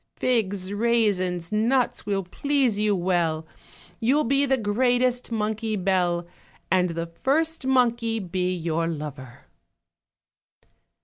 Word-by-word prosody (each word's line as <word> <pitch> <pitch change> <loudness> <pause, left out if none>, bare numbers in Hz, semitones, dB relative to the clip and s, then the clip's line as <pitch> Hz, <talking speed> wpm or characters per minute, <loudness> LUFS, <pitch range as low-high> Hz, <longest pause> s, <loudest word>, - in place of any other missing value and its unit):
Figs, 200 -6 -1
raisins, 205 -6 +1
nuts 230 +1 +1
will 195 -1 0
please 260 +2 0
you 210 -1 +2
well, 175 -3 0 0.5
You'll 265 +6 +2
be 275 +3 +2
the 265 0 +2
greatest 245 +3 +1
monkey 220 0 -1
belle. 180 -3 +1 0.5
And 180 0 +3
the 165 0 -3
first 280 - -1
monkey 235 -3 +2
be 185 -2 -2
your 165 -1 -1
lorer." 145 -6 -7
210 Hz, 110 wpm, -25 LUFS, 180-245 Hz, 0.5 s, And